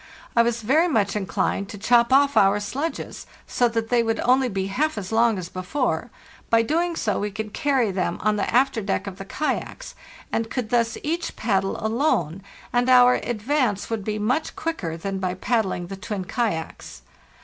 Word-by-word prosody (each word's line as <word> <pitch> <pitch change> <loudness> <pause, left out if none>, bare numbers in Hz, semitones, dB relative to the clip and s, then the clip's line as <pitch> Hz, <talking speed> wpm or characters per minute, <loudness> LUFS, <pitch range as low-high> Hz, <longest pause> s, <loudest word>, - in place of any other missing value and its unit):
I 235 - +6
was 235 -1 0
very 305 +10 +3
much 210 - +1
inclined 200 0 -1
to 205 - -7
chop 235 +3 +3
off 280 +1 +4
our 200 +1 +4
sledges, 275 +11 -4 0.2
so 245 - +2
that 225 -1 -2
they 245 -1 +3
would 225 -1 -1
only 255 +1 +3
be 195 -3 -2
half 275 +9 -1
as 195 -1 -5
long 225 -1 +3
as 180 -2 -5
before; 185 - -2 0.4
by 230 0 +5
so - - -7
doing 340 +2 0 0.3
we 210 - -1
could 215 +1 -6
carry 270 -8 +1
them 180 -2 -1
on 215 +1 +2
the 205 - -1
after 255 -1 +2
deck 200 0 -2
of 195 -1 -7
the 195 - -6
kayaks, 310 - -3 0.4
and 225 0 -1
could 240 -3 -3
thus 230 -2 +1
each 335 +3 -2
paddle 195 -3 0
alone, 220 - 0 0.3
and 245 +1 +2
our 250 -1 +7
advance 240 -2 -1
would 220 -3 -2
be 215 +1 -2
much 250 +9 -1
quicker 195 - -3
than 195 +3 -4
by 185 -1 -2
pad 225 +3 +1
dling 175 -2 -4
the 195 +1 -7
twin 190 0 -5
kayaks. 165 - -3
225 Hz, 190 wpm, -23 LUFS, 195-250 Hz, 0.4 s, our